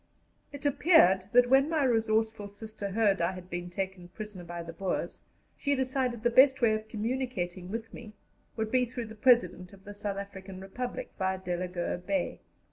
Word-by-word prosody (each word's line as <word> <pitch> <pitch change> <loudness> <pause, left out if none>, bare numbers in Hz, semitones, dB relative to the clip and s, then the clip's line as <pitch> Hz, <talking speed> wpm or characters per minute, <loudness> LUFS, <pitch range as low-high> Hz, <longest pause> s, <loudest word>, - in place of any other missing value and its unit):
It 285 0 -9
appeared 260 - +5
that, 245 0 +6
when 270 +3 +5
my 315 -3 +1
resourceful 220 -3 +1
sister 210 0 -7
heard 200 -2 +2
I 170 +2 +1
had 185 0 -10
been 175 0 -4
taken 190 0 -4
prisoner 210 -1 -8
by 170 0 -6
the 165 0 -8
Boers, 185 +2 -3 0.3
she 285 -1 0
decided 255 -3 -1
the 240 - +3
best 265 +2 +6
way 230 -3 +4
of 215 0 -3
communicating 215 -6 -3
with 225 +2 -5
me 215 -3 -10 0.4
would 220 -1 -2
be 255 -1 +4
through 240 0 -5
the 220 - -10
President 210 -6 +3
of 195 -1 -16
the 205 - -9
South 205 -1 -4
African 195 -1 -8
Republic, 245 +6 -5
via 190 0 0
Delagoa 180 -1 -3
Bay. 285 +10 -2
210 Hz, 180 wpm, -30 LUFS, 185-245 Hz, 0.4 s, that